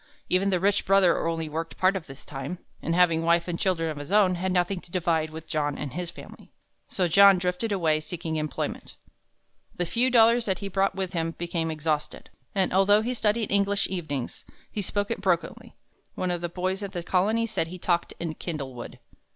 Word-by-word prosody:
Even 190 +2 +2
the 185 -2 +1
rich 200 +2 +2
brother 190 -4 +4
only 165 -1 -2
worked 165 +2 -5
part 190 +1 +3
of 185 -4 -5
the 135 - -9
time, 140 +5 -7 0.2
and 165 - -1
having 170 -2 +4
wife 170 +1 +2
and 170 -1 -3
children 175 -4 +1
of 155 -2 -4
his 145 +4 -7
own, 200 -3 +5
had 185 +1 -2
nothing 180 +1 0
to - - -15
divide 165 -3 0
with 160 +1 -9
John 145 -2 -1
and 140 -4 -5
his 175 -1 -4
family. - - -12 0.4
So 185 -2 0
John 200 +3 +7
drifted 180 +5 -2
away 165 -6 +2
seeking 160 0 -4
employment. 155 -1 -4 0.8
The 175 - -1
few 240 +8 +1
dollars 235 -1 +5
that 190 -3 0
he 200 - -5
brought 195 0 +1
with 190 -1 -3
him 165 -1 -2
became 170 -1 -2
exhausted, 155 -1 -3 0.2
and 190 -2 +1
although 205 +3 +5
he 245 +2 -1
studied 220 -2 0
English 200 0 +2
evenings, 155 -8 -4 0.3
he 210 - -2
spoke 205 +1 -2
it - - -3
brokenly. 180 -4 -1 0.4
One 185 -1 -1
of 175 -1 -2
the 175 - -2
boys 185 +3 -2
at 200 -1 -5
the 175 -2 -4
Colony 210 +6 +1
said 220 -7 -1
he 180 +2 -8
talked 175 -1 0
in 165 -2 -3
"kindlewood." 135 -8 -6
180 Hz, 200 wpm, -26 LUFS, 165-195 Hz, 0.8 s, John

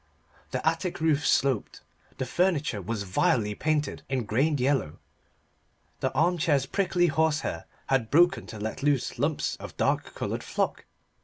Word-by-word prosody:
The - - -2
attic 180 -3 0
roof 150 -3 +2
sloped, 135 -6 +1 0.4
the 130 - -2
furniture 155 - 0
was 100 +2 -3
vilely 105 +3 +1
painted 150 +4 -1
in 130 -2 0
grained 135 +8 +1
yellow, 130 - 0 1.0
the - - 0
arm 175 +2 +2
chair's 145 -4 +2
prickly 180 +2 +1
horsehair 160 -1 0 0.2
had 125 -5 +1
broken 175 +5 +4
to 110 - -8
let 110 +5 -4
loose 140 -3 0
lumps 145 +3 0
of - - -10
dark - - 0
coloured - - -3
flock. - - -2
145 Hz, 145 wpm, -27 LUFS, 120-160 Hz, 1.0 s, broken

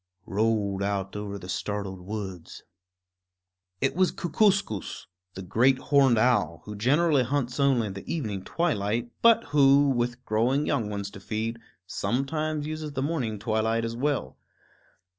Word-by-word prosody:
_ - - -57 0.2
rolled 105 -2 0
out 100 -1 -2
over 105 -1 -4
the 90 -2 -10
startled 95 +2 -3
woods. 95 -3 -7 1.2
It 135 - +1
was 185 0 +3
Kookooskoos, 185 - 0 0.3
the 95 - -6
great 125 +8 +3
horned 135 -3 +3
owl, 100 -9 +2
who 105 - -7
generally 145 +7 +3
hunts 125 0 -1
only 135 -5 +3
in 100 - -5
the 100 - -7
evening 105 - -3
twilight, 120 - -1
but 230 0 +6
who, 140 0 +6
with 120 0 -2
growing 125 +7 +1
young 110 -3 0
ones 100 -1 -4
to 100 - -10
feed, 110 +3 -3 0.3
sometimes 150 - -2
uses 155 -1 -5
the 135 -1 -2
morning 135 -8 -2
twilight 110 +2 0
as 115 0 -4
well. 140 +2 -2
115 Hz, 145 wpm, -27 LUFS, 100-140 Hz, 1.2 s, but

